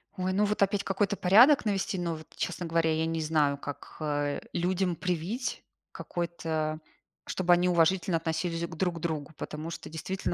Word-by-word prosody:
Ой, 185 0 -1
ну 205 +2 +3
вот 210 0 -1
опять 200 0 +1
какой-то 200 +1 0
порядок 230 +10 +6
навести, 195 -2 0
но 170 -2 -1
вот, 155 0 -10
честно 180 0 -3
говоря, 165 -1 +2
я 160 +1 +1
не 165 0 -1
знаю, 150 -2 +2
как, 145 0 -8
э, 145 -2 -1
людям 180 +1 0
привить, 180 - -2 0.3
какой-то 160 -2 -3 0.5
чтобы 180 -1 +1
они 175 +1 +5
уважительно 175 +1 +3
относились 165 +1 -2
к 170 -1 -8
друг 175 -2 -1
другу. 160 -3 -3
Потому 155 +2 -5
что, 170 - -7
действительно, 180 +4 -3
170 Hz, 170 wpm, -29 LUFS, 160-185 Hz, 0.5 s, порядок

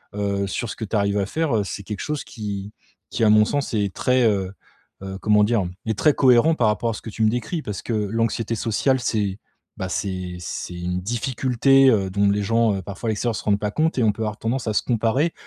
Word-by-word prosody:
heu, 100 -1 -1
sur 115 +4 -3
ce - - -5
que 110 - -5
tu 110 - -4
arrives 100 0 +1
à 100 - 0
faire, 155 +4 -1
heu, 105 - +1
c'est 100 - -6
quelque 105 0 -6
chose 150 -1 -3
qui 105 -2 -6 0.4
qui 115 - -1
à - - +5
mon 105 0 +6
sens 145 +2 -2
est 100 -3 0
très, 125 0 +2
heu 100 -3 +1 0.5
heu, 95 0 -6
comment 105 0 +4
dire, 105 -3 +2 0.2
est 110 -2 -2
très 150 - +4
cohérent 130 +5 +4
par 120 -7 +2
rapport 105 +2 0
à - - -4
ce - - -8
que - - -8
tu 110 - -2
me 110 - +5
décris 125 +9 -2
parce 105 -3 -5
que - - -5
l'anxiété 115 +2 -1
sociale, 125 +4 +1
c'est 105 -5 -1 0.4
bah, 95 - -4
c'est 90 -2 -3
c'est 90 +1 -6
une 90 +1 -3
difficulté, 130 +5 +3
heu, 100 -6 +2
dont 100 +1 +2
les 100 +1 +1
gens 115 -2 +2
parfois 100 +5 -5
à - - +2
l'extérieur 110 +2 -1
se - - -5
rendent 100 -1 +2
pas 105 - -1
compte 160 +6 0
et 125 - +2
on 110 - +4
peut 115 - -8
avoir 110 0 -3
tendance 115 +3 -2
à 110 - 0
se - - +2
comparer 125 +7 +1
110 Hz, 245 wpm, -22 LUFS, 100-120 Hz, 0.5 s, mon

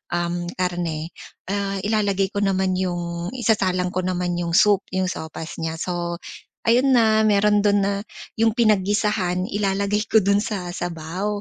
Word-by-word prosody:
um, 175 0 -1 0.2
karne, 170 -3 -2 0.4
ah, 200 -1 -1
ilalagay 200 -2 +1
ko 205 0 -1
naman 190 -1 +1
yung 175 -1 -3
isasalang 190 -7 +1
ko 185 - 0
naman 180 -1 -1
yung 170 -1 -2
soup, 205 -2 +4
yung 185 -1 0
sopas 160 0 -7
niya. 160 0 -3
So, 175 -1 -3 0.5
ayun 250 +4 +4
na, 220 -2 +4
meron 210 0 +4
dun 205 -1 +3
na 200 +1 -1 0.4
yung 225 0 +4
pinaggisahan, 205 -4 +1
ilalagay 200 +1 0
ko 220 - +6
dun 200 +1 +3
sa 190 -5 -4
sabaw, 175 +5 -3
195 Hz, 145 wpm, -22 LUFS, 175-210 Hz, 0.5 s, ko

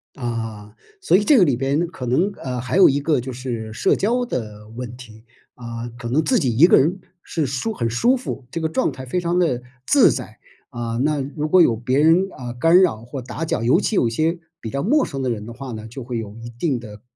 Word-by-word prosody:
啊， 115 -4 -5 0.3
所 380 - +3
以 205 - +1
这 280 +6 +5
个 200 - +7
里 140 -6 +2
边 135 +6 0
可 170 -7 -7
能， 160 +12 +1
呃， 125 -1 -4
还 130 +8 -2
有 195 - +8
一 140 +1 +1
个 145 -2 +1
就 130 +2 -6
是 120 -3 -5
社 120 - +2
交 245 +4 0
的 105 - -6
问 120 +1 -7
题。 115 -3 -14 0.3
啊， 115 -1 -6
可 120 -1 -6
能 140 +7 +1
自 255 -3 +2
己 130 -9 0
一 145 +9 +7
个 - - +6
人 175 +8 +1 0.2
是 160 -3 -2
舒 135 - -2
很 115 - -2
舒 235 - +3
服， 245 - -6
这 165 - -4
个 160 - 0
状 155 - 0
态 130 0 -8
非 135 +8 -1
常 175 0 0
地 145 -9 +1 0.2
自 285 - +6
在， - - -5 0.3
啊， 120 -3 -4
那 150 0 +1 0.2
如 150 0 -2
果 185 +3 +6
有 120 -9 +4
别 125 +4 0
人， 165 +5 +4
啊， 120 -2 -7
干 165 +9 +5
扰 115 - +1
或 125 +3 -7
打 125 +6 -6
搅， 160 - -1
尤 125 - +3
其 210 - 0
有 120 - +3
些 160 +9 0 0.2
比 110 - -5
较 140 +4 -2
陌 285 - +3
生 135 -4 -5
的 130 - -1
人 105 -3 -3
的 115 - -8
话 130 +1 -7
呢， 110 0 -7
就 135 +4 -8
会 120 -1 -4
有 110 -1 -6
一 115 +1 -8
定 120 +3 -2
的 105 -3 -11
130 Hz, 260 characters per minute, -21 LUFS, 120-165 Hz, 0.3 s, 有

